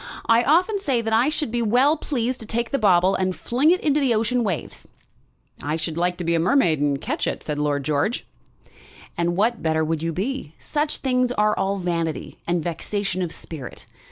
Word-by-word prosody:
I 230 +1 +5
often 360 - +3
say 270 -11 0
that 225 0 -1
I 235 +6 +4
should 300 -5 -2
be 240 0 0
well 250 +7 +4
pleased 255 -5 -2
to 220 - -9
take 235 +1 -2
the 275 - +1
bauble 185 -2 +4
and 185 -1 0
fling 260 +6 +1
it 365 +2 +4
into 295 -1 +2
the 260 -5 +2
ocean 235 +3 +1
waves." 190 -7 -4 0.7
"I 150 +3 -1
should 160 0 -3
like 175 +1 0
to 180 - -4
be 170 0 +1
a 165 - +2
mermaid 175 - +3
and 145 -1 +1
catch - - -2
it," - - -3
said 150 -1 -3
Lord 145 -1 0
George. 150 - 0 0.9
"And 175 0 0
what 225 +4 +1
better 160 -1 +1
would 160 0 -1
you 165 0 -1
be? 200 - -4
Such 300 0 -2
things 250 -2 +1
are 210 -2 +2
all 195 +1 0
vanity 170 -3 -3
and 170 -1 0
vexation 185 +3 -2
of 175 -3 -2
spirit. 150 -7 -9
205 Hz, 205 wpm, -23 LUFS, 165-250 Hz, 0.9 s, I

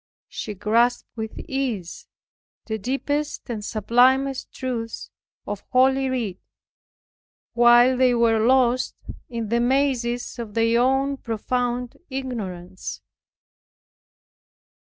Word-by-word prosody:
She 210 - -6
grasped 235 +5 +2
with 220 -1 -6
ease 245 -11 -3 0.6
the 220 -1 -3
deepest 285 +6 -2
and 215 -3 -4
sublimest 255 +5 +2
truths 235 -3 -5 0.3
of 205 -1 -5
holy 265 +1 +3
Writ, 225 -8 -2 1.1
while 240 +1 +6
they 250 -1 +3
were 230 -1 +3
lost 250 +1 +3 0.3
in 230 -3 -4
the 235 +1 +2
mazes 245 -1 0
of 220 -3 -6
their 230 +1 +3
own 270 +2 +2
profound 245 +1 -2
ignorance. 185 - -5
240 Hz, 95 wpm, -23 LUFS, 225-260 Hz, 1.1 s, while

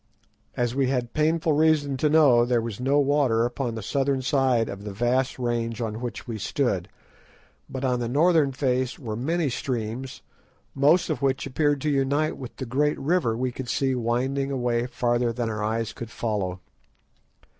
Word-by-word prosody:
As 120 -1 0
we 135 0 +1
had 125 -3 -1
painful 160 +1 +2
reason 150 -2 +2
to 150 +3 +2
know, 145 -6 +5
there 120 0 +2
was 115 -3 -5
no 135 +3 +2
water 140 -5 +3
upon 120 -1 -3
the 110 - -5
southern 135 +2 0
side 130 -4 +2
of 100 0 -7
the 105 - -5
vast 120 +5 0
range 115 -2 -2
on 110 -1 -3
which 120 -1 -6
we 115 -2 -4
stood, 100 -6 -1 0.8
but 130 0 -4
on 125 -1 +1
the 120 -1 -2
northern 155 +1 +3
face 130 -2 -1
were 115 -6 -5
many 160 +7 0
streams, 125 0 -4 0.5
most 155 +6 +3
of 155 - -3
which 135 -1 0
appeared 145 +1 0
to 150 - 0
unite 140 +3 +1
with 130 -2 -9
the 130 - -5
great 145 +5 0
river 140 -7 +1
we 130 +1 -1
could 125 0 -7
see 135 +2 +1
winding 130 +3 -1
away 120 -3 0
farther 120 -1 0
than 115 -1 -2
our 105 -1 -3
eyes 110 +1 -1
could 120 - -7
follow. 100 -6 -3
125 Hz, 175 wpm, -25 LUFS, 115-140 Hz, 0.8 s, know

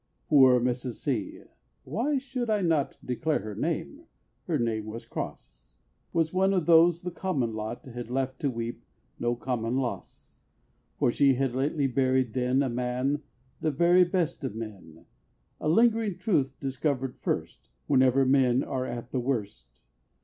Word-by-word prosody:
Poor 130 -4 +7
Mrs. 125 0 -1
C 120 -8 -3 0.4
(why 280 +6 -1
should 255 -3 -3
I 210 -2 +2
not 160 -5 +1
Declare 150 +5 0
her 105 +1 -6
name? - - -3 0.4
her - - +1
name 110 -2 -1
was 115 +2 -7
Cross) - - -8 0.3
Was 165 -1 0
one 190 +1 +3
of 180 -4 +1
those 170 0 +5
the 180 - -3
"common 145 -11 -1
lot" 110 +2 -5
Had 120 -2 -7
left 130 +1 -2
to 145 - 0
weep 115 -1 -4 0.4
"no 120 0 0
common 120 -1 -2
loss"; 130 -3 -5 0.6
For 120 - +2
she 135 +1 +4
had 135 -1 0
lately 140 +3 0
buried 130 -2 +1
then 130 +2 +2
A - - 0
man, 125 +4 -1 0.4
the 160 - 0
"very 175 +5 +5
best 175 -4 -1
of 130 -6 -3
men," 95 -8 -9 0.5
A 155 - -1
lingering 225 +1 +3
truth, 145 - 0
discovered 135 -1 -2
first - - -3 0.2
Whenever 130 -1 +4
men 130 -1 +3
"are 130 -1 -3
at 120 0 -6
the 130 - 0
worst." 100 - -4
130 Hz, 155 wpm, -28 LUFS, 120-160 Hz, 0.6 s, Poor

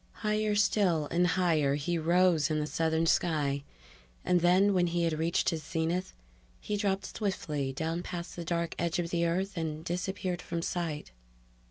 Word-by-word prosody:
Higher 215 0 +1
still 195 -7 +2
and 175 +1 +3
higher 165 -5 +2
he 150 +4 -1
rose 170 -2 +3
in 155 - 0
the 150 - -1
southern 160 +1 0
sky, 145 -5 +1 0.6
and 180 -1 +3
then, 185 +4 +4
when 180 -2 +3
he 170 0 0
had 165 -1 +1
reached 165 +5 +1
his 160 -2 -3
zenith, 165 +4 -2 0.4
he 210 - -3
dropped 200 -1 -1
swiftly 150 -9 -2
down 160 +5 -2
past 175 -1 -6
the 175 - -5
dark 170 0 -1
edge 170 -1 0
of 170 -1 -2
the 170 -1 +1
Earth 190 +4 -1
and 160 -1 -4
disappeared 180 0 -2
from 170 0 -4
sight. 165 - -3
170 Hz, 170 wpm, -30 LUFS, 160-180 Hz, 0.6 s, then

